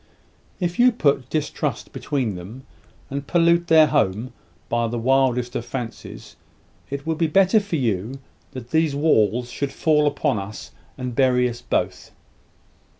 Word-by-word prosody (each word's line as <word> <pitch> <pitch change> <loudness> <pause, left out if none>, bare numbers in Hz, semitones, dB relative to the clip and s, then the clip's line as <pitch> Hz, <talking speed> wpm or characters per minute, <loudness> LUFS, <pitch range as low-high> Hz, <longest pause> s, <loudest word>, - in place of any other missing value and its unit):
If 175 +1 -2
you 250 +1 +6
put 140 - +1
distrust 155 -2 -3
between 130 -7 -2
them, 100 +9 -10 0.5
and 140 0 -4
pollute 170 0 +3
their 160 -1 +7
home 120 -5 0 0.3
by 120 0 0
the 120 +1 -3
wildest 125 0 +1
of - - -2
fancies, 120 -2 -7 0.5
it 140 +1 -5
would 160 -1 -2
be 165 - +2
better 190 +6 +4
for 200 -4 -4
you 115 - -1 0.4
that 125 -2 -9
these 160 -3 +2
walls 120 -5 +2
should 140 -1 -3
fall 150 -2 +2
upon 145 -5 0
us, 100 +2 -8 0.3
and 125 -1 -4
bury 125 0 +3
us 120 0 -6
both." - - -2
135 Hz, 150 wpm, -22 LUFS, 120-155 Hz, 0.5 s, their